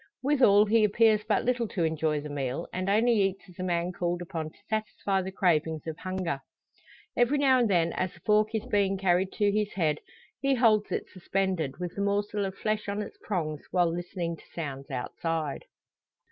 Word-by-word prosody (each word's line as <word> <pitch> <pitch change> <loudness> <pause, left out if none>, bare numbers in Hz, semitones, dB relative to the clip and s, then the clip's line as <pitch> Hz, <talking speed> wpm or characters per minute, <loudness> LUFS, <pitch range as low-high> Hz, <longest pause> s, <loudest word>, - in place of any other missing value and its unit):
Withal, 250 -8 +5
he 220 +1 +4
appears 215 0 +4
but 215 -1 +1
little 245 -2 +1
to 180 -4 -2
enjoy 160 -2 0
the 150 - -6
meal, 140 +2 -3
and 185 +1 -2
only 225 +1 +4
eats 195 0 -1
as 180 -1 -17
a - - -2
man 175 -1 0
called 175 -1 -2
upon 165 -3 -4
to - - -24
satisfy 215 -3 -1
the 190 +1 -5
cravings 160 -4 +1
of 160 -1 -4
hunger. 185 -6 -2 0.8
Every 245 +4 +3
now 265 -2 +4
and 235 -3 +2
then, 170 -3 +2
as 185 -1 -1
the - - -17
fork 215 +1 +2
is 220 +1 -2
being 200 -5 +1
carried 185 0 +2
to 205 -1 +2
his 210 0 0
head, 155 -5 +1 0.4
he 275 +1 +2
holds 220 -4 +3
it - - -2
suspended, 185 -6 -2
with 180 -1 -4
the 200 - -4
morsel 205 0 0
of 190 0 -4
flesh 215 0 -2
on 205 +1 -1
its - - -11
prongs, 155 -7 -2
while 175 -2 +2
listening 175 -1 -4
to - - -18
sounds 140 -4 -6
outside! 150 +3 -3
190 Hz, 195 wpm, -28 LUFS, 170-210 Hz, 0.8 s, Withal